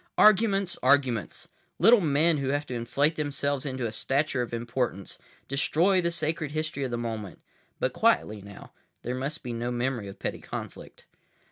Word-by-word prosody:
Arguments! 200 -3 +4
Arguments! 130 - +1 0.3
Little 225 +5 +6
men 155 +1 +3
who 140 -2 -2
have 145 +1 0
to 130 - -6
inflate 135 +7 0
themselves 145 -1 -1
into 130 -2 -3
a 110 - -2
stature 135 +3 0
of 120 - -4
importance—destroy 130 - -1
the 170 - +1
sacred 160 -2 -2
history 155 -1 -3
of 130 - -2
the 120 - -2
moment. 110 -4 -5 0.4
But - - 0
quietly 105 -1 +2
now. 100 0 -12 0.3
There 125 - -2
must 140 +5 -4
be 120 -2 -4
no 120 +1 -2
memory 120 -3 -2
of 100 - -9
petty - - -4
conflict. - - -8
140 Hz, 160 wpm, -27 LUFS, 120-155 Hz, 0.4 s, Little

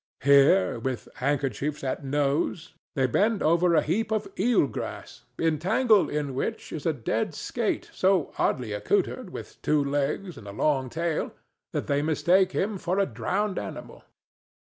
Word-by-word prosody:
Here, 135 -8 +5
with 130 +1 -3
handkerchiefs 140 +1 -1
at 130 +1 -2
nose, 145 +4 -1 0.2
they 135 -3 +2
bend 205 - +1
over 170 +2 +3
a - - +4
heap 210 +8 0
of 215 -1 0
eel 235 -9 +4
grass 120 - -7
entangled 185 - +3
in 145 -2 -2
which 130 - -3
is - - -3
a - - +4
dead - - -2
skate - - -2
so 185 -4 +2
oddly 120 -5 0
accoutred 105 0 0
with - - -9
two 150 -1 +2
legs 145 +4 -2
and 105 - -12
a - - -6
long 135 +2 +1
tail 165 +2 -2 0.4
that - - -2
they 140 0 +1
mistake 180 +5 +3
him 200 0 -1
for 180 +2 -1
a 200 - +3
drowned 185 - -2
animal. - - -8
150 Hz, 155 wpm, -26 LUFS, 135-185 Hz, 0.4 s, Here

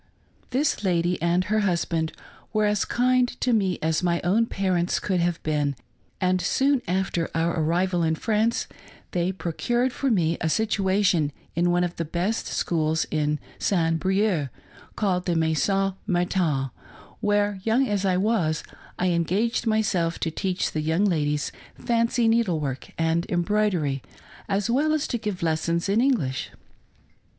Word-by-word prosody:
This 265 -3 0
lady 175 -2 +1
and 170 +2 +2
her 215 +3 +1
husband 170 -4 0 0.4
were 215 -1 +2
as 210 -1 +1
kind 250 0 +2
to 250 - +1
me 195 -5 +1
as 160 +1 +1
my 170 -1 +1
own 215 +6 +2
parents 185 -4 0
could 185 -3 0
have 170 0 +1
been; 145 -2 0 0.4
and 185 0 +1
soon 270 +9 +2
after 180 -2 -1
our 165 +1 +1
arrival 175 +3 +1
in 160 -1 +1
France 220 +5 0 0.5
they 175 +1 0
procured 240 +8 -1
for 275 - -1
me 170 -7 +1
a 160 - +1
situation 190 -6 +2 0.2
in 175 +2 +2
one 175 0 +2
of 175 -1 -3
the 170 - -1
best 175 +7 -2
schools 160 -1 0
in 150 -1 +1 0.2
St. 165 -4 +1
Brieux, 190 -6 +1 0.5
called 185 -4 0
the 175 - +1
Maison 165 +5 +1
Martin, 175 - 0 0.5
where, 205 -2 +1
young 230 +6 +2
as 205 -3 0
I 185 -2 +2
was, 185 -6 +1 0.3
I 185 - +1
engaged 185 +8 0
myself 195 -6 +1
to 160 - 0
teach 185 +3 -1
the 155 - -2
young 160 +6 +1
ladies 150 -6 0 0.3
fancy 230 0 +1
needlework 170 - 0
and 165 +1 +1
embroidery, 175 -6 +1 0.5
as 195 0 0
well 285 +6 +2
as 310 -2 0
to 240 - -1
give 210 -5 -4
lessons 165 +2 0
in 205 +4 +2
English. 170 - 0
180 Hz, 150 wpm, -25 LUFS, 165-210 Hz, 0.5 s, and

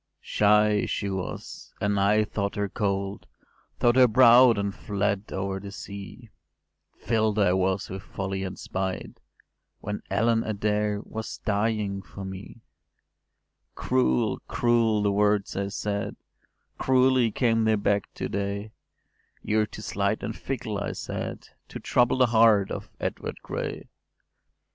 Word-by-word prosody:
“Shy 105 0 +3
she 100 -1 -2
was, 95 -2 -6
and 100 0 +1
I 105 +2 +4
thought 100 -1 -3
her 105 0 -1
cold; 100 0 -2 0.5
Thought 120 +1 +3
her 130 -1 +8
proud, 120 0 +7
and 100 0 -1
fled 100 0 -2
over 95 0 -2
the 100 0 -8
sea; 100 +4 -9 0.7
Fill’d 110 -1 0
I 100 -4 +4
was 95 +1 0
with 95 +1 -6
folly 95 -1 -4
and 95 0 -5
spite, 95 0 -4 0.6
When 105 +1 -5
Ellen 115 +3 +2
Adair 105 -1 -1
was 110 0 -6
dying 105 -2 0
for 95 +1 -9
me. 95 +4 -9 1.1
“Cruel, 65 -1 +1
cruel 115 -3 +2
the 100 - +2
words 105 0 +1
I 100 0 -1
said! 100 0 -3 0.6
Cruelly 130 -2 +3
came 115 0 +1
they 110 0 +4
back 100 -1 0
to - - -3
day: 100 +2 -3 0.7
‘You’re 105 0 +1
too 110 - -10
slight 100 +1 -1
and 110 - -3
fickle,’ 120 -6 -4
I - - -3
said, - - -6 0.2
‘To - - -8
trouble 125 +1 +2
the 130 - +5
heart 110 -4 +4
of - - -5
Edward - - -4
Gray’. - - -5
105 Hz, 135 wpm, -26 LUFS, 100-110 Hz, 1.1 s, her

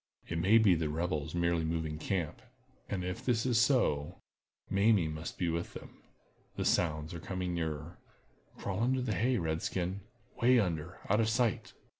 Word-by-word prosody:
It 80 - -2
may 100 +7 +5
be 110 -5 +6
the 80 -2 0
rebels 80 -1 -2
merely 85 -1 +1
moving 80 -1 -2
camp. 85 -3 -2 0.5
And 95 -3 -2
if 90 0 -4
this 120 -2 +1
is 120 -3 +3
so, 120 - +2 0.5
Mamie 100 -3 +3
must 80 +2 -6
be 90 - 0
with 85 +1 -2
them. - - -11 0.5
The - - -2
sounds 80 -2 +1
are 85 - -5
coming 90 +1 -3
nearer—crawl 80 +5 -6
under 130 +2 +2
the 115 -3 -1
hay, 120 +6 +2
red 80 -3 -1
skin—way 100 +7 0
under, 85 -3 -2
out 105 +3 +3
of 110 -1 +2
sight." 115 -2 0
90 Hz, 160 wpm, -32 LUFS, 80-110 Hz, 0.5 s, be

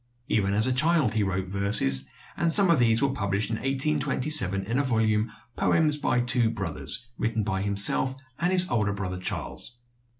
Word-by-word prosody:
Even 100 -2 0
as 110 +2 +2
a 130 - 0
child 155 -3 +1
he 110 - 0
wrote 95 -1 -2
verses, 95 -9 +1 0.3
and 170 -1 0
some 195 -1 +6
of 160 - +2
these 115 +1 +2
were 140 - +1
published 100 -2 -2
in 110 - -2
1827 135 -6 +1
in 115 +7 -2
a - - +1
volume, 110 -3 -1 0.2
"Poems 155 -2 +1
by 125 -4 -1
Two 120 -1 +1
Brothers," 95 +3 -4
written 115 -1 -2
by 95 -2 -3
himself 100 +6 +3 0.2
and 175 +2 0
his 185 -1 +3
elder 105 -3 0
brother 95 -2 -5
Charles. 120 +5 -5
115 Hz, 175 wpm, -25 LUFS, 100-135 Hz, 0.3 s, some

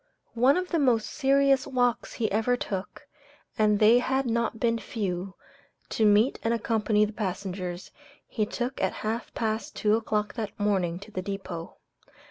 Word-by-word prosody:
One 255 +6 +4
of 365 0 -2
the 335 - +1
most 245 -6 +2
serious 275 -1 +3
walks 245 -2 0
he 225 -3 -1
ever 225 +4 +1
took 195 -4 -5 0.5
and 210 -1 +3
they 220 +4 +6
had 265 +2 0
not 230 -1 -1
been 230 0 +1
a - - -11
few 190 -3 -4 0.5
to 220 - +2
meet 210 +5 +4
and 225 - +1
accompany 215 -2 +1
passengers, 185 -3 -4 0.4
he 215 -2 -1
took 250 +4 -3
at - - +1
half 225 +2 -2
past 220 0 -2
two 210 0 +2
o'clock 215 -2 -1
that 215 -3 -5
morning 190 -5 +1
to 215 - -11
the 185 - -3
depot. 185 -4 -6
220 Hz, 160 wpm, -27 LUFS, 205-245 Hz, 0.5 s, they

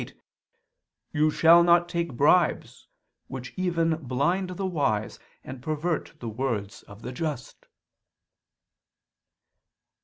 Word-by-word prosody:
'Neither 155 0 +3
shalt 170 +2 +6
thou'] 170 0 +6
take 170 -5 -3
bribes, 155 +5 +2 0.4
which 125 -2 -8
even 165 -3 0
blind 155 +7 -1
the 185 +2 -4
wise, 140 - -1 0.2
and 130 -1 -9
pervert 155 +3 -3
the 120 - -6
words 110 -4 -3
of 100 +1 -13
the - - -5
just." 135 -3 -5
155 Hz, 100 wpm, -26 LUFS, 125-170 Hz, 0.4 s, shalt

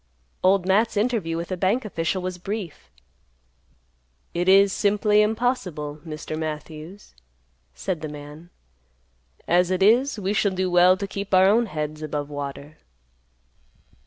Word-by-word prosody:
Old 185 0 +3
Matt's 210 +4 +2
interview 205 -7 0
with 170 +1 -5
the 185 - -3
bank 200 +7 +1
official 180 -1 -2
was 185 -1 -4
brief. 190 - -6 1.4
"It 175 +2 0
is 195 0 +6
simply 210 0 +3
impossible, 210 - -1
Mr. 155 -1 -6
Matthews," 155 +4 -7 0.6
said 155 - -3
the 155 - -5
man; 150 +3 -11 1.0
"as 175 +1 +3
it 185 0 +1
is, 240 +6 +4
we 200 0 -1
shall 200 -1 +1
do 185 0 -1
well 180 +1 +5
to 200 - -3
keep 200 0 -2
our 185 0 +6
own 225 +4 +3
heads 155 -2 -5
above 150 -1 -4
water." 145 +1 -7
185 Hz, 135 wpm, -24 LUFS, 155-205 Hz, 1.4 s, is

